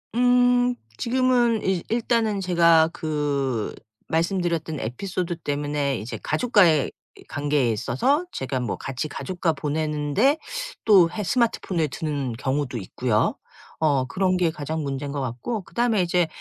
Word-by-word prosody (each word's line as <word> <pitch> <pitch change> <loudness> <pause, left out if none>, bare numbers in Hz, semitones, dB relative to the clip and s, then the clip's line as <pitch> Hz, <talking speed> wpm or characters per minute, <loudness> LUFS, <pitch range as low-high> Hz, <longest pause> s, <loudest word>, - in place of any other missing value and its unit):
음. 245 0 +4 0.2
지금은 240 -2 +2
일 190 -3 0
일단은 225 -3 +1
제가 170 -3 +4
그 140 -8 -2 0.3
말씀드렸던 165 -2 -1
에피소드 175 - -3
때문에 145 -3 -1
이제 110 - -6
가족과의 185 - +3 0.3
이 - - -14
관계에 145 -4 0
있어서 255 - +1
제가 130 0 -3
뭐 120 -4 -3
같이 135 +3 -4
가족과 175 +1 -2
보내는데 150 - +1 0.5
또 190 -6 +6
해 210 +2 -4
스마트폰을 185 -6 0
드는 140 -4 -3
경우도 130 +1 -2
있고요. 110 +3 0 0.4
어 140 -5 +2
그런 185 +5 0
게 175 -2 +2
가장 155 0 -4
문제인 140 0 -3
것 140 -1 -3
같고 130 - -3
그다음에 235 -4 +1
이제 175 -1 +2
160 Hz, 295 characters per minute, -24 LUFS, 140-205 Hz, 0.5 s, 또